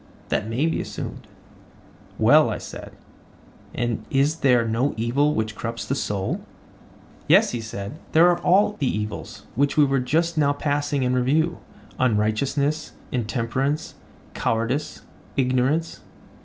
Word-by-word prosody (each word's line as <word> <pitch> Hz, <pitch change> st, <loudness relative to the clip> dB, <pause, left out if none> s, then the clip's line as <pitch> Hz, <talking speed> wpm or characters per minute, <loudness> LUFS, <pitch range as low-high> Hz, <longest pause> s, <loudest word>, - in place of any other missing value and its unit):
That 105 Hz, -, 0 dB
may 125 Hz, +7 st, 0 dB
be 165 Hz, -, 0 dB
assumed. -, -, -7 dB, 0.9 s
Well, -, -, +5 dB
I -, -, -2 dB
said, -, -, -9 dB, 0.8 s
and 120 Hz, -2 st, -1 dB
is 145 Hz, +4 st, +2 dB
there 125 Hz, -6 st, +3 dB
no 120 Hz, +6 st, 0 dB
evil 140 Hz, +7 st, +1 dB
which 110 Hz, -1 st, -2 dB
corrupts 115 Hz, +1 st, -4 dB
the -, -, -1 dB
soul? 100 Hz, -8 st, -2 dB, 0.9 s
Yes, -, -, +5 dB
he 120 Hz, -, -3 dB
said, 110 Hz, +4 st, -7 dB
there 165 Hz, +2 st, +7 dB
are 175 Hz, -1 st, +3 dB
all 205 Hz, +3 st, +3 dB
the 140 Hz, -, +1 dB
evils 105 Hz, -2 st, -4 dB
which 140 Hz, +4 st, +1 dB
we 150 Hz, -, +7 dB
were 135 Hz, -1 st, +1 dB
just 160 Hz, +6 st, 0 dB
now 145 Hz, -1 st, +3 dB
passing 145 Hz, -1 st, -1 dB
in 125 Hz, 0 st, +1 dB
review: 150 Hz, +7 st, +1 dB, 0.4 s
unrighteousness, 135 Hz, +7 st, 0 dB, 0.2 s
intemperance, 130 Hz, +5 st, -1 dB, 0.4 s
cowardice, 115 Hz, +6 st, -1 dB, 0.3 s
ignorance. 135 Hz, +5 st, +1 dB
135 Hz, 130 wpm, -23 LUFS, 115-150 Hz, 0.9 s, there